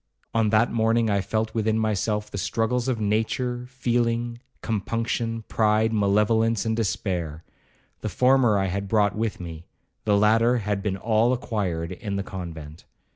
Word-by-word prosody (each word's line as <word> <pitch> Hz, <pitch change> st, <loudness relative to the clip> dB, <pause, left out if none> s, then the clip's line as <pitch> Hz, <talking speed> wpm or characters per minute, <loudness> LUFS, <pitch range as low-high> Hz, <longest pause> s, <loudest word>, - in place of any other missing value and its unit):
—on 115 Hz, -2 st, +2 dB
that 110 Hz, +2 st, +3 dB
morning 115 Hz, 0 st, +2 dB
I 100 Hz, -1 st, +2 dB
felt 110 Hz, +2 st, -2 dB
within 110 Hz, -1 st, +1 dB
myself 105 Hz, -1 st, -1 dB
the 100 Hz, -, -4 dB
struggles 115 Hz, +6 st, 0 dB
of 125 Hz, -4 st, 0 dB
nature, 120 Hz, +4 st, -1 dB
feeling, 120 Hz, -2 st, -1 dB, 0.2 s
compunction, 115 Hz, +1 st, -2 dB
pride, 110 Hz, 0 st, +2 dB
malevolence, 105 Hz, +2 st, +2 dB
and 110 Hz, 0 st, 0 dB
despair.—The 90 Hz, -7 st, -5 dB
former 125 Hz, -4 st, +4 dB
I 95 Hz, -, +1 dB
had 100 Hz, +2 st, -2 dB
brought 105 Hz, -1 st, +2 dB
with 110 Hz, 0 st, -2 dB
me, 85 Hz, -2 st, -8 dB, 0.4 s
the 105 Hz, -1 st, +3 dB
latter 115 Hz, +4 st, +4 dB
had 105 Hz, -3 st, -2 dB
been 95 Hz, -1 st, -2 dB
all 110 Hz, +4 st, +2 dB
acquired 95 Hz, -9 st, -2 dB
in 100 Hz, +2 st, -5 dB
the 100 Hz, -, -1 dB
convent. 80 Hz, -5 st, -8 dB
110 Hz, 145 wpm, -25 LUFS, 100-115 Hz, 0.4 s, former